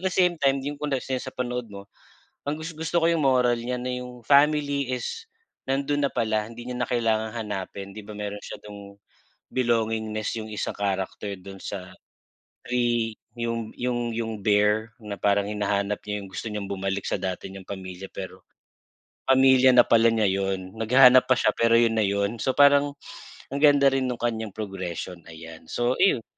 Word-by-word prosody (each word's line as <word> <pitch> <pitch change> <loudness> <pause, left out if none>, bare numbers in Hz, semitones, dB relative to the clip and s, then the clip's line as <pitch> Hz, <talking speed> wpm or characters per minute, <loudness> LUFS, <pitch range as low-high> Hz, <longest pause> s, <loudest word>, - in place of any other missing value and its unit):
the 190 - 0
same 180 -3 +2
time, 135 -1 +2
yung 145 0 -5
kung 150 - -2
sa 130 0 -4
panood 125 -2 -3
mo 100 -1 -10 0.6
ang 150 +2 -2
gus 165 0 -6
gusto 165 +2 0
ko 165 - +4
yung 165 -3 +1
moral 125 -2 +4
niya 125 +1 -3
na 125 - -3
yung 125 0 -7
family 140 0 +3
is 455 - -4 0.4
nandun 140 +2 0
na - - -1
pala 110 -2 0
hindi 120 +2 -10
niya 125 - -4
na 120 - 0
kailangang 110 -2 +1
hanapin. 100 -2 -5
'Di 105 - -8
ba 105 - -9
meron 105 0 -5
siya - - -8
dung 100 -1 -11 0.5
belongingness 110 -3 0
yung 110 - -8
isang 105 - -3
character 100 0 -3
dun 95 +1 -11
sa 95 -2 -6 0.8
ay, 120 -2 +1 0.3
yung 115 -1 -3
yung 120 -1 -2
yung 115 0 -3
bear 105 +2 +2
na 105 -2 -6
parang 100 0 +2
hinahanap 105 -1 -1
niya 105 0 -3
yung 100 - -9
gusto 95 +4 -6
niyang 105 -2 -4
bumalik 95 0 -3
sa - - 0
dati 95 -1 -4
niyang 95 -1 -10
pamilya 95 -1 -7
pero, 95 -1 -8 0.9
pamilya 130 -1 +6
na 125 -1 +6
pala 115 0 +5
niya 110 -2 +2
yun. 95 0 -2
Naghahanap 125 +3 +6
pa 130 - +5
siya - - +2
pero 115 0 +4
yun 115 -1 +3
na 110 - +2
yun. 100 +2 0
So - - +1
parang 145 0 +5 0.5
ang 140 - -2
ganda 140 -2 +6
rin 130 -1 0
nung 125 - -2
kanyang 110 -4 -3
progression, 95 -4 -5
ayan 80 0 -11
so 120 +1 0
iyon. 130 - +3
115 Hz, 180 wpm, -25 LUFS, 100-130 Hz, 0.9 s, pamilya